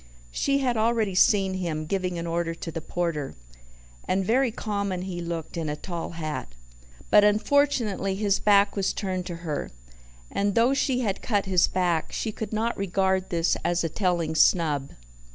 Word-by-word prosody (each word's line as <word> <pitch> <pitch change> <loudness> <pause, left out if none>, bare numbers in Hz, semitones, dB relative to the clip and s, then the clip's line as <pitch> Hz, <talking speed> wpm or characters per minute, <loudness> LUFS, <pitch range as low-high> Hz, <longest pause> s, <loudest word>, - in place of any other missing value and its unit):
She 275 - +1
had 250 -3 0
already 220 -2 +1
seen 195 -1 +4
him, 165 -4 -3
giving 180 +1 -2
an 170 - -4
order 165 0 -2
to 165 - -6
the 165 - -5
porter 165 -4 -3 0.7
and 190 +1 +1
very 255 +5 +3
common 200 -4 -3
he 180 -2 -5
looked 170 -1 -5
in 160 -2 -2
a 150 - -2
tall 170 +1 -6
hat. 155 - -5 0.6
But 210 - +7
unfortunately 215 -3 +2
his 200 0 +1
back 200 -1 +4
was 195 -2 0
turned 185 -2 -3
to 175 - -4
her, 150 -3 -3 0.6
and 200 0 0
though 235 +4 +4
she 265 -2 +1
had 205 -5 -2
cut 205 -4 0
his 185 -2 +3
back, 175 -3 0
she 220 - -2
could 215 +1 -6
not 225 +2 -1
regard 190 -1 0
this 170 -1 +1
as 175 0 +1
a 165 - -1
telling 170 -3 0
snub. 155 -4 +3
190 Hz, 170 wpm, -26 LUFS, 170-210 Hz, 0.7 s, But